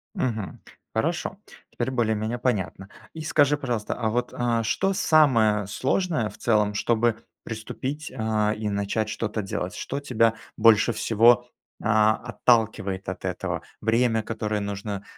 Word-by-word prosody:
Мгм, 110 -6 -3 0.3
хорошо, 165 - -1 0.3
теперь 120 +1 -2
более-менее 110 -1 0
понятно. 100 -5 -2 0.2
И 160 - -7
скажи, 150 -2 +3
пожалуйста, 120 -7 -2
а 115 -3 -1
вот, 120 +2 -1
э, 120 -1 0
что 195 - +1
самое 115 - +4
сложное 130 - 0
в - - -14
целом, 105 -3 +2
чтобы 115 +1 +2 0.3
приступить, 135 +7 -5
э, 110 -3 0
и 105 0 -3
начать 100 +2 -1
что-то 105 0 -2
делать? 95 -2 -4
Что 140 - -4
тебя 115 -5 +2 0.2
больше 115 +1 +5
всего, 120 +2 +4 0.4
э, - - -9
отталкивает 110 -2 +2
от - - -6
этого? - - -3 0.2
Время, 115 0 +2
которое 105 -2 -2
нужно, 100 0 -4
115 Hz, 135 wpm, -25 LUFS, 105-125 Hz, 0.4 s, больше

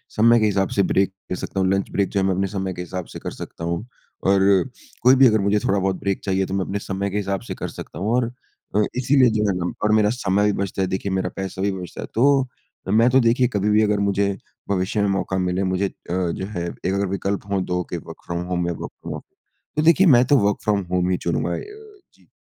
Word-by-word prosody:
समय 115 +2 +5
के 110 - +2
हिसाब 100 -2 +1
से 100 - +5
ब्रेक 95 +1 +2 0.2
ले - - 0
सकता 95 - -4
हूँ। 95 0 +2
लंच 95 0 0
ब्रेक 100 -1 0
जो 100 - -1
है 95 - +1
मैं 95 - +2
अपने 95 +1 0
समय 95 -1 -2
के 90 - -6
हिसाब 90 0 -5
से - - -5
कर - - -5
सकता - - -9
हूँ। 85 +6 -2 0.4
और 95 0 +4 0.6
कोई 130 +2 +6
भी 135 0 +7
अगर 110 -2 +3
मुझे 100 +1 +2
थोड़ा 100 0 +1
बहुत 95 0 0
ब्रेक 100 -1 -1
चाहिए 95 -1 0
तो 95 - -6
मैं 95 -1 0
अपने 100 - -3
समय 100 0 -3
के 100 - -3
हिसाब 100 -1 -2
से - - -3
कर - - -5
सकता 80 - -9
हूँ। 105 +4 -1
और 120 -1 +1 0.4
अ, 105 - +4 0.2
इसीलिए 130 0 +4
जो 105 -1 0
है 95 - 0
ना 90 0 -2
और 105 - +3
मेरा 105 -1 +4
समय 105 -4 +1
भी 105 - +3
बचता 95 0 -3
है। 95 - +1
देखिए 95 +1 -2
मेरा 95 0 0
पैसा 95 -1 -5
भी 100 0 +1
बचता 90 -2 -7
है। - - -6
तो 135 +2 +4 0.4
मैं 115 +5 +5
तो 130 +1 +5
देखिए 120 +1 +3
कभी-भी 105 +1 +3
अगर 105 -1 +1
मुझे 100 0 +1 0.4
भविष्य 100 +2 0
में 100 - +2
मौका 95 -1 -1
मिले 90 +1 0
मुझे 95 +1 0
अ, - - -9 0.2
जो 90 0 -1
है 90 -4 -4
एक 95 - -3
अगर 100 0 0
विकल्प 100 +1 -2
हों 95 -2 +1
2 90 0 -1
के - - -3
वर्क़ - - -11
फ्रॉम 85 0 -3
होम 90 -1 -1
में 85 - -1
वर्क़ - - -6
फ्रॉम - - -5
ऑफ - - -8 0.5
तो 150 - +3
देखिए 170 +3 +5
मैं 125 -4 +7
तो 140 +2 +4
वर्क़ 105 - +2
फ्रॉम 105 -2 +1
होम 90 0 +1
ही 90 - +1
चुनूँगा। 85 - 0
ए - - -6 0.5
जी। - - -27
100 Hz, 260 wpm, -22 LUFS, 95-105 Hz, 0.6 s, भी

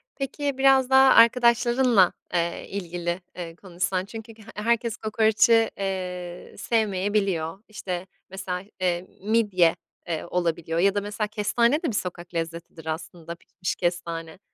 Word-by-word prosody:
peki, 280 0 -3
biraz 265 -1 +4
daha 265 0 +7
arkadaşlarınla, 235 -3 +5 0.2
eee, 170 -1 -1
ilgili, 175 -2 -4
eee, 170 -2 -7
konuşsan 185 +1 -2
çünkü 225 +2 -9
he 220 0 -17
herkes 230 +1 0
kokoreci, 220 +1 +3
eee, 180 -2 -5
sevmeyebiliyor. 200 -4 0
İşte, 185 -4 -5 0.2
mesela, 185 -1 -4 0.2
eee, 180 0 0
midye, 200 -5 +3 0.3
eee, 165 -2 -3
olabiliyor 170 -2 -1
ya 195 +3 +3
da, 205 - +1
mesela, 205 +1 -3
kestane 235 +7 +1
de - - -40
bir - - -1
sokak 175 -2 -4
lezzetidir 165 -1 -5
aslında, 165 +1 -6
pişmiş 185 +2 -5
kestane. 170 -2 -3
190 Hz, 130 wpm, -25 LUFS, 175-225 Hz, 0.3 s, daha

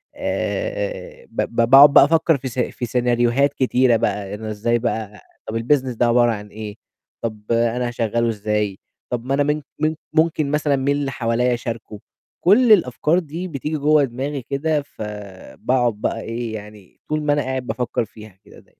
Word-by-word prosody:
آآ - - -3
ب - - -2
ب - - -4
باقعد 140 +2 +9
بقى - - +9
أفكر 165 0 +3
في 130 0 -6
س 125 0 -5
في 125 0 -2
سيناريوهات 120 +3 +2
كتيرة 130 -2 +3
بقى، 100 -2 -2
إن 110 - -10
إزاي 110 +2 0
بقى 110 -3 -3 0.3
طَب 110 - -2
الbusiness 130 0 +1
ده 120 - +3
عبارة 120 0 +4
عن 105 -2 -5
إيه، 105 0 -8 0.5
طَب 110 -2 -4
أنا 120 +1 +1
هاشغّله 115 0 0
إزاي، 105 -2 -2 0.3
طَب 120 -1 -3
ما 135 - -1
أنا 145 +1 +3
من 150 +1 0 0.2
من 155 +1 +1 0.2
ممكن 155 -2 +1
مثلًا 150 -1 +1
مين 140 +1 +1
اللي 140 -1 -2
حواليَّ 120 0 0
أشاركه؟ 115 -3 -5 0.4
كل 220 +7 +5
الأفكار 165 - +3
دي 170 +2 -6
بتيجي 150 -1 -3
جوّا 150 +1 +4
دماغي 135 +2 -3
كده، 145 +4 -1
فباقعد 105 +2 -3
بقى 105 - -3
إيه، 115 0 -4
يعني 105 -2 -12
طول 155 0 0
ما 150 -1 +2
أنا 145 - +1
قاعد 130 -2 -3
بافكر 125 -2 -2
فيها 105 -3 -14
كده - - -16
داي - - -22
125 Hz, 175 wpm, -21 LUFS, 115-145 Hz, 0.5 s, باقعد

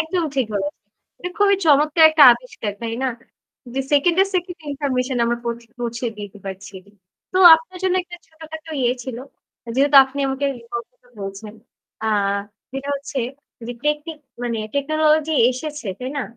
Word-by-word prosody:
একদম 340 +3 -1
ঠিক 265 -3 +1
বলেছেন। 195 0 -3 0.4
এটা 360 - -5
খুবই 400 -1 +4
চমৎকার 305 +2 +5
একটা 315 -2 +5
আবিষ্কার 235 -4 -5
তাই 230 -1 -3
না? - - +2 0.7
যে 270 - 0
সেকেন্ডে, 340 +6 +4
সেকেন্ডে 355 -2 -3
ইনফরমেশন 260 -3 -1
আমার 235 0 0
পৌঁ 235 0 -1 0.2
পৌঁছে 235 0 -4
দিতে 205 0 -8
পারছি। 195 +1 -8 0.6
তো - - -2 0.2
আপনার 330 +3 -6
জন্য 375 -1 +1
একটা 350 0 -11
ছোটখাটো 315 0 -11
ইয়ে 245 0 +2
ছিল 255 -2 -6 0.6
যেহেতু 280 +1 +4
আপনি 270 +2 -6
আমাকে 270 +1 -2 0.2
information 235 +1 -9
বলছেন। 195 +2 -7 0.5
আ - - 0 0.7
যেটা 270 +1 -5
হচ্ছে 280 0 -6 0.7
টেকনিক 300 +1 -2 0.2
মানে 235 -2 -2 0.2
টেকনোলজি 310 +2 +2 0.2
এসেছে 295 +1 -6
তাই 255 +1 -5
না? - - -1
280 Hz, 145 wpm, -21 LUFS, 240-315 Hz, 0.7 s, চমৎকার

